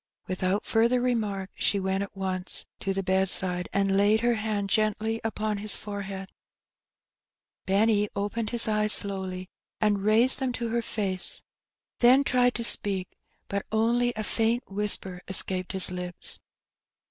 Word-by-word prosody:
Without 185 +2 -2
further 235 +2 +2
remark, 210 -6 -2
she 200 - +1
went 190 0 -1
at 200 0 -7
once 185 -1 -1
to 195 - -2
the 195 0 -2
bed 190 0 +1
side, 180 -1 +1
and 195 0 +1
laid 205 +2 +3
her 240 0 +2
hand 215 -2 -2
gently 215 +2 0
upon 215 -2 -2
his 210 0 +2
forehead, 195 -2 -7 1.4
^enny 205 +2 +2
opened 210 +2 -3
his 235 -1 +4
eyes 215 0 +4
slowly, 190 -2 -1 0.3
and 210 -2 +1
raised 225 +6 +4
them 260 -2 -2
to 235 -2 -4
her 235 +1 0
face, 195 -5 -4 0.6
then 255 +3 +5
tried 250 -2 +2
to 235 - -3
speak, 195 -5 +2 0.4
but 200 0 -3
only 235 +2 +1
a 215 - -3
faint 230 +3 0
whisper 195 -2 -1
escaped 185 -1 +1
his 190 -1 +5
lips. 180 -1 -5
205 Hz, 145 wpm, -26 LUFS, 190-225 Hz, 1.4 s, then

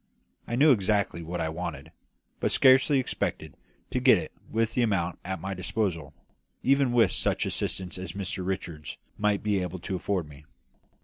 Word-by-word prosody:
I 120 - -2
knew 145 +4 +6
exactly 100 -5 +1
what 85 +2 -5
I 80 -1 -1
wanted, 80 -4 -6 0.5
but - - +1
scarcely 135 +2 +5
expected 130 - -2 0.4
to - - 0
get - - +6
it - - -5 0.2
with 115 0 0
the 125 - +1
amount 95 -7 0
at 95 0 -4
my 95 +3 -4
disposal, 90 -4 -2 0.5
even 135 -1 +3
with 115 -6 +4
such - - 0
assistance 90 -1 -3
as 95 - -5
Mr 95 -1 -3
Richards 85 -5 -4 0.2
might 105 -1 +1
be 105 -2 +1
able 90 0 -3
to 95 +2 -4
afford 90 -2 -2
me. 75 0 -14
95 Hz, 170 wpm, -27 LUFS, 85-110 Hz, 0.5 s, knew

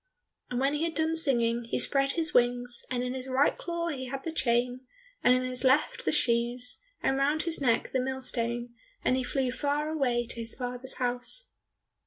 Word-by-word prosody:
And 245 - -2
when 275 +2 +2
he 295 +2 -1
had 330 -1 -2
done 320 0 +2
singing, 240 -6 +2
he 230 - -2
spread 275 -1 +1
his 320 -2 0
wings, 245 0 +2
and 250 -1 -1
in 250 0 -2
his 260 0 -5
right 265 +2 +3
claw 340 0 -3
he 260 -4 -4
had 270 +1 -5
the 330 - -3
chain, 245 -3 0 0.4
and 250 - +6
in 255 - 0
his 255 0 -3
left 265 +3 +2
the - - +2
shoes, 240 +1 0 0.2
and 270 - +2
round 290 +3 +2
his 335 -3 0
neck 235 -4 +1
the 260 - +1
millstone, 240 -2 -2 0.3
and 255 - +3
he 260 - 0
flew 260 0 -1
far 290 +3 -1
away 250 -6 0
to - - -5
his 230 0 0
father's 250 +1 -1
house. 250 - 0
255 Hz, 200 wpm, -29 LUFS, 245-285 Hz, 0.4 s, and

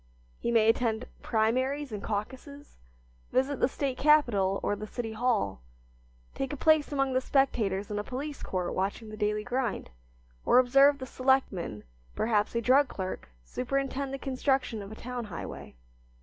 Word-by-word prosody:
He - - -2
may 225 -2 +4
attend 225 0 +1 0.2
primaries 255 +5 0
and 210 -2 -5
caucuses, 260 +8 -6 0.5
visit 265 +1 +1
the - - +4
State 270 -1 -3
capital 235 -11 +4
or 205 - +1
the 215 +1 -7
City 225 0 -5
Hall, 220 - 0 0.7
take 270 -1 -3
a 290 - -4
place 310 +1 +3
among 275 -2 0
the 255 - +2
spectators 215 -8 +1
in 205 - -1
a - - -2
police 280 +5 -5
court 180 -2 -2
watching 200 +4 -2
the 215 - -7
daily 210 0 -1
grind, 245 - -2 0.5
or - - +4
observe 275 +3 +6
the 260 - -6
selectman, 255 - 0 0.3
perhaps 215 -1 +1
a 235 - +1
drug 260 +4 +4
clerk, 185 - -5
superintend 275 - -2
the 275 - -3
construction 265 -4 -1
of 200 +1 -9
a - - -7
town 245 0 -5
highway. 185 -5 -8
245 Hz, 160 wpm, -29 LUFS, 210-270 Hz, 0.7 s, observe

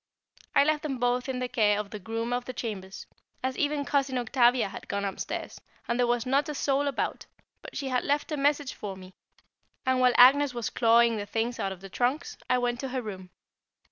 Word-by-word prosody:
I - - +7
left 305 0 +1
them 280 -4 -3
both 245 +1 0
in 260 - -2
the 250 0 -2
care 215 -4 +2
of 210 -1 -5
the 210 - -6
groom 225 +4 -3
of 245 0 -2
the 255 - -6
chambers, 200 -5 -6 0.4
as 260 0 -1
even 290 0 0
Cousin 275 -3 0
Octavia 240 -2 +3
had - - -9
gone 200 0 -2
upstairs, 195 - -5 0.3
and 235 +1 -1
there 245 - +3
was 240 0 +1
not 275 +4 +1
a 300 - -4
soul 280 +1 +1
about, 280 - -2 0.3
but - - -9
she 275 -2 -3
had 250 -1 0
left 290 +3 0
a - - 0
message 285 -1 +1
for 200 -2 -6
me; 185 0 -12 0.7
and 260 0 +2
while 250 -1 +5
Agnès 270 +1 +6
was 235 -2 -3
clawing 235 -1 +4
the 205 0 -5
things 230 +3 -2
out 195 - -1
of 190 -1 -8
the 195 - -8
trunks, 260 - -1
I 250 - +4
went 245 -1 -1
to 270 - -3
her 255 0 -2
room. 190 -4 -7
245 Hz, 220 wpm, -28 LUFS, 225-270 Hz, 0.7 s, I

